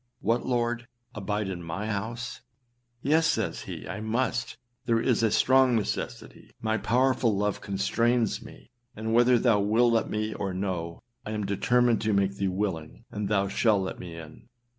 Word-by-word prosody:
What, 115 +2 +1
Lord! 120 -1 -1 0.3
abide 105 0 -2
in 90 -2 -4
my 85 +5 -4
house!â 120 +3 -7
âYes,â 160 +3 +4
says 150 - 0
he, - - -7
âI 100 +3 -6
must, 120 +1 -1 0.3
there 115 -1 +3
is 120 0 +2
a 115 - +3
strong 130 +2 +4
necessity; 110 - -4
my 110 0 0
powerful 125 -3 +2
love 105 0 -1
constrains 115 +3 +1
me, - - -14 0.2
and 110 +1 -3
whether 120 +1 +5
thou 115 -3 +3
wilt 115 +4 +3
let 115 - +1
me 110 +1 -2
or 95 -2 -3
no, 90 -3 -3 0.2
I 110 - -5
am 105 -1 -2
determined 120 +4 +2
to 110 -1 +1
make 100 0 +1
thee 100 - 0
willing, 90 -9 -3
and 105 -1 -3
thou 100 -2 +2
shalt 105 -1 +2
let 95 - -5
me 85 -2 -8
in. 80 -1 -12
110 Hz, 170 wpm, -27 LUFS, 100-120 Hz, 0.3 s, whether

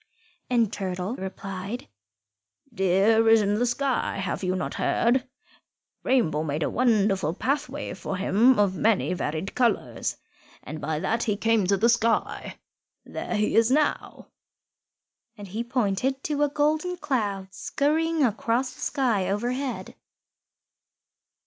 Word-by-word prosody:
And 235 -4 +2
Turtle 185 +3 -3
replied, 195 +3 -6 0.9
"Deer 200 +4 +3
is 225 0 +7
in 205 +1 +1
the 245 - +2
sky. 265 +1 -1
Have 195 0 -3
you 185 0 0
not 185 - -3
heard? 245 +2 +1 0.7
Rainbow 165 - +1
made 155 0 -2
a - - -1
wonderful 205 -9 +2
pathway 285 +2 -2
for 190 0 -5
him 220 +7 +4
of 200 -2 +3
many 210 -2 +2
varied 160 +1 -3
colours, 200 - 0 0.5
and 155 +1 -7
by 155 +1 -2
that 225 +7 0
he 210 -2 0
came 225 -3 +2
to 200 +1 +3
the 220 +5 +3
sky. 230 -1 0 0.5
There - - -4
he 210 0 +1
is 225 +1 +5
now," 295 +3 0 1.1
and 205 -1 -9
he 220 +5 -3
pointed 250 +2 -1
to 295 -1 -1
a 295 - +3
golden 310 +5 0
cloud 205 - -2
scurrying 315 +8 0
across 240 +3 0
the - - -14
sky 235 -10 0
overhead. 245 +6 -2
225 Hz, 130 wpm, -26 LUFS, 190-255 Hz, 1.1 s, is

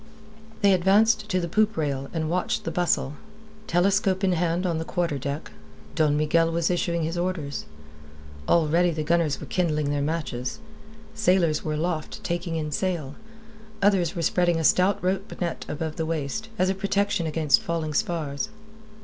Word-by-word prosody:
They 200 -1 +6
advanced 210 +4 +3
to 185 -2 +1
the 170 - -2
poop 215 +4 +1
rail, 140 -3 -2
and 160 -2 -2
watched 180 +3 -1
the - - -3
bustle. 160 -5 0 0.5
Telescope 190 +2 +2
in 190 - +3
hand 175 +1 0
on 170 -3 0
the - - -2
quarter 170 -4 -1
deck, 140 +3 -4 0.4
Don 150 -2 +2
Miguel 165 +2 +2
was 170 +1 +1
issuing 170 -1 0
his 165 +2 -2
orders. 170 -6 -3 0.8
Already 170 +2 +3
the 155 -2 -2
gunners 160 -2 +1
were - - -7
kindling 155 -5 0
their 145 -1 0
matches; 140 -5 -2 0.6
sailors 175 -4 +2
were 155 - -2
aloft, 160 0 -3
taking 170 -1 -2
in 155 -1 -2
sail; 160 -4 -2 0.7
others 195 -4 +2
were 170 - -2
spreading 175 0 +2
a - - -1
stout 185 +5 +4
rope 190 +2 -2
net 170 -2 -3
above 160 0 -4
the 160 - -1
waist, 165 +8 -3
as 185 - +2
a - - 0
protection 200 -2 0
against 155 -4 +3
falling 165 -2 -2
spars. 150 +2 -1
170 Hz, 165 wpm, -25 LUFS, 155-185 Hz, 0.8 s, They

